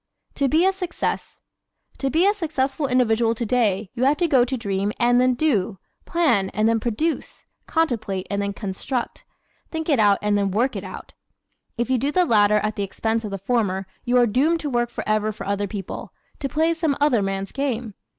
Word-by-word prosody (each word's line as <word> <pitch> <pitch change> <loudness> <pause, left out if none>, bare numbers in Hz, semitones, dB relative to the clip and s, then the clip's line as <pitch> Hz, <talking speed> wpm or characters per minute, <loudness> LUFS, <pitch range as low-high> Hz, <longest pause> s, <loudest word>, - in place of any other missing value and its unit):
To 280 - +1
be 320 +6 +3
a 385 - +3
Success 360 -3 -4 0.5
¶ - - -23
To 270 - 0
be 330 +6 +3
a 405 - +4
successful 300 -6 -1
individual 235 -3 +2
today 220 -4 0
you 250 - -2
have 285 +2 +3
got 280 -8 +3
to 260 +1 -2
dream 200 -2 -1
and 245 +1 +4
then 255 0 +3
DO; 225 -9 +1 0.3
plan 240 - +2
and 215 +2 +2
then 225 0 +2
PRODUCE; 245 +9 -2 0.2
contemplate 215 - -1
and 200 0 0
then 200 0 -1
CONSTRUCT; 210 +5 -4 0.5
think 320 0 -4
it 280 -5 +3
out 205 -2 +5
and 210 0 +2
then 200 -1 +1
WORK 230 +6 0
it 195 - -4
out. 185 -1 -9 0.6
If 240 +2 -1
you 255 - +3
do 280 +4 0
the 360 +3 +3
latter 210 -5 +4
at 215 0 -1
the 200 - 0
expense 225 +3 -1
of 210 - -4
the 195 - -4
former 195 -2 0 0.2
you 245 +1 +2
are 245 - +6
doomed 280 +9 +2
to 290 - -3
work 240 -1 +1
forever 215 -1 -1
for 215 - -8
other 200 0 -1
people, 195 -2 -6 0.3
to 275 - -2
play 320 +5 +2
some 320 -4 0
other 285 -7 +3
man's 195 0 -2
game. 250 -6 -2
235 Hz, 200 wpm, -23 LUFS, 205-280 Hz, 0.6 s, are